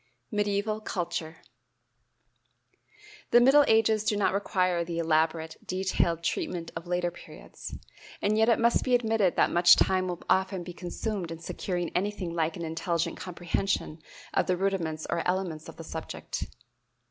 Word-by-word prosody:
Medieval 210 +1 0
Culture. 170 -5 -4 1.9
The 240 - +7
middle 270 +4 +7
ages 220 -1 +4
do 215 -1 +1
not 205 - +2
require 185 -3 +1
the 170 0 -5
elaborate, 160 0 +1
detailed 180 -3 0
treatment 170 0 -2
of 165 +1 -6
later 175 0 0
periods; 175 - -10 0.4
and 210 +1 +1
yet 220 +2 +4
it 230 - +5
must 235 0 +3
be 250 - +3
admitted 225 -6 +2
that - - +3
much 175 0 +7
time 185 -1 +2
will 175 -1 -5
often 190 -1 +1
be 180 - -8
consumed 180 +1 -4
in 165 - -5
securing 175 +1 -3
anything 190 -2 -1
like 165 -1 0
an 170 - -4
intelligent 170 +1 -1
comprehension 175 -2 -2 0.3
of - - +2
the 180 -1 +1
rudiments 175 -5 -1
or 170 - 0
elements 180 -4 -2
of - - -10
the - - -9
subject. - - -5
180 Hz, 150 wpm, -28 LUFS, 170-205 Hz, 1.9 s, The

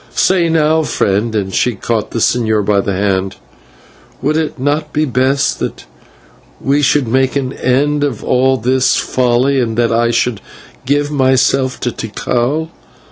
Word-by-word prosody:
Say, 180 -3 +2
now, 160 0 +2
friend" 110 -6 -1
and 95 -2 -2
she 125 -2 +1
caught 110 +2 -2
the - - -5
señor 110 -2 +1
by 100 -1 +2
the 100 - -3 0.2
arm 95 0 -2 0.9
"would 150 +3 0
it 160 -3 -2
not 145 +3 -1
be 155 +1 0
best 130 +2 0
that - - -5 0.7
we 140 +2 +1
should 145 -2 +2
make 130 +3 +1
an 135 -1 -2
end 145 +3 0
of 135 -7 -2
all 130 +1 +2
this 130 +2 +1
folly, 130 +2 +1
and 115 -3 -2
that 120 -1 +2
I 115 +1 +2
should 120 -2 0 0.5
give 145 +1 +1
myself 130 -1 +1
to 120 - -1
Tikal? 125 +8 -2
130 Hz, 155 wpm, -15 LUFS, 115-145 Hz, 0.9 s, Say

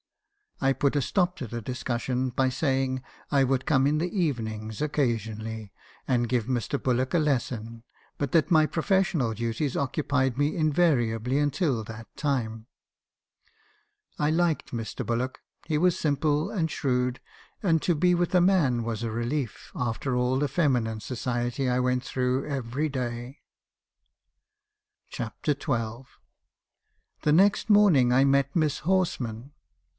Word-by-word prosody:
"I 135 0 +4
put 140 +2 0
a 145 - +2
stop 180 +6 +1
to 135 -7 -5
the 120 +2 -5
discussion 125 +1 -2
by 130 +1 +1
saying 130 -1 0 0.3
I 140 -1 +4
would 130 0 0
come 135 -2 +3
in 150 - +2
in - - +1
the 175 +5 -2
evenings 110 - -2
occasionally, 110 -7 -2 0.4
and 120 -3 +1
give 120 -4 +1
Mr. 130 +2 -2
Bullock 130 +2 0
a - - +4
lesson, 120 -6 -2 0.4
but 140 -3 -1
that 165 +2 +3
my 155 -2 +6
professional 165 - +1
duties 115 +5 -2
occupied 135 -2 0
me 145 +1 +1
invariably 135 -7 +2
until 145 - 0
that 110 +1 -10
time. 115 -6 -2 1.5
"I 150 - +2
liked 165 -1 0
Mr. 115 -2 -4
Bullock. 120 +2 -2 0.3
He 155 - 0
was 180 +1 +2
simple, 150 0 +1
and 165 -6 0
shrewd; 125 -3 -1 0.4
and 165 -4 +3
to 175 - +2
be 180 +4 +3
with 175 0 0
a 180 - +6
man 160 -11 +3
was 115 -2 -3
a 115 -1 -2
relief, 120 +2 -3
after 125 +2 -2
all 125 +1 +1
the 145 +2 +1
feminine 125 -7 +1
society 120 +2 -2
I 125 0 +1
went 125 0 +1
through 130 +1 -1
every 140 +2 -2
day. 125 -1 -4 1.7
CHAPTER 150 - -2
XH. 120 -3 -3 1.2
"The 150 - +3
next 195 +6 +4
morning 190 - +5
I 130 +2 +5
met 140 0 +2
Miss 155 -4 +1
Horsman. 140 -9 -1
130 Hz, 140 wpm, -27 LUFS, 120-150 Hz, 1.7 s, my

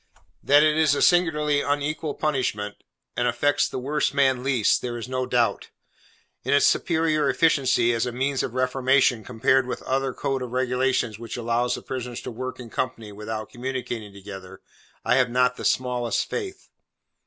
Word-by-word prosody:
That 145 +1 +5
it 155 0 +3
is 155 -3 +4
a - - -1
singularly 150 -5 +3
unequal 145 +1 -2
punishment, 115 -9 -1 0.4
and 120 - +1
affects 120 +5 +1
the - - -5
worst 140 +3 -1
man 130 -3 +3
least, 130 -5 +2
there 120 -1 -4
is 115 - -6
no 130 0 -2
doubt. 120 -2 0 0.7
In 130 +3 +2
its 145 - +4
superior 160 -3 +2
efficiency 135 -7 +3
as 115 +1 0
a - - -2
means 135 +2 -1
of 125 - -4
reformation, 130 -2 +2
compared 125 +3 +1
with - - -3
that - - -16
other 135 0 0
code 135 +1 -2
of 125 -1 -6
regulations 125 -3 0
which 115 0 -6
allows 120 +1 0
the - - -9
prisoners 125 -2 -5
to - - -6
work 130 +3 -6
in 120 -3 -10
company 115 -4 -3
without 110 +1 -6
communicating 120 -4 -5
together, 95 -1 -10 0.4
I 125 +2 +3
have 125 -1 +3
not 125 +1 +2
the - - -8
smallest 125 -2 0
faith. 390 -3 -6
130 Hz, 175 wpm, -24 LUFS, 120-140 Hz, 0.7 s, That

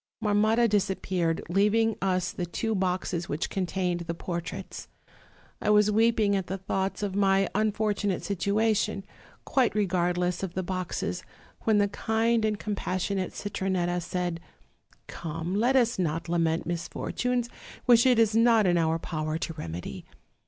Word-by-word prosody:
"Marmotta 215 +3 +3
disappeared, 190 -5 0
leaving 210 +5 +2
us 185 -2 0
the 180 -4 -4
two 220 +6 -2
boxes 180 -3 -1
which 150 +3 -2
contained 180 -2 -1
the 170 0 -4
portraits. 170 0 -6 0.7
I - - 0
was 210 0 +5
weeping 220 -1 +3
at 190 -2 -2
the 190 - -3
thoughts 190 +1 -2
of 200 -2 -2
my 195 -1 +3
unfortunate 210 -2 0
situation, 200 +1 0 0.4
quite 255 -5 +2
regardless 180 -3 0
of 190 -3 -4
the 185 - -1
boxes, 185 0 -3 0.4
when 220 -2 +4
the 205 0 +3
kind 225 +2 +1
and 215 -1 0
compassionate 190 -2 -2
Citronetta 185 -3 -1
said: 175 0 -3 0.7
'Come, 165 +2 -5
let 240 +6 +2
us 235 -5 +3
not 165 -1 -1
lament 165 -1 +1
misfortunes 240 +8 -2 0.4
which 240 0 +6
it 250 -2 +5
is 220 -1 +3
not 230 -2 +5
in 175 -2 +3
our 160 0 +2
power 155 -1 -3
to 165 - -4
remedy. 85 - -6
195 Hz, 140 wpm, -27 LUFS, 175-215 Hz, 0.7 s, which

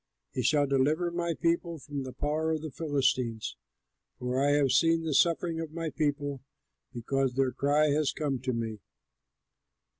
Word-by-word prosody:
He 125 - -2
shall 145 +4 +3
deliver 145 +6 +1
my 170 -1 -1
people 170 0 0
from 145 -1 -6
the 130 -1 -6
power 155 +4 -1
of 155 -1 -3
the 155 - -5
Philistines; 130 -7 0 0.6
for 125 +1 -1
I 145 0 +3
have 145 -3 +3
seen 165 0 +3
the 160 -2 -1
suffering 165 +2 +2
of 160 -2 -5
my 165 -1 -3
people, 145 -3 -1 0.5
because 130 +1 -1
their 135 -1 +2
cry 145 +3 +2
has 145 0 +2
come 140 -4 -2
to 130 +1 -2
me." 115 -3 -3
145 Hz, 160 wpm, -29 LUFS, 130-160 Hz, 0.6 s, shall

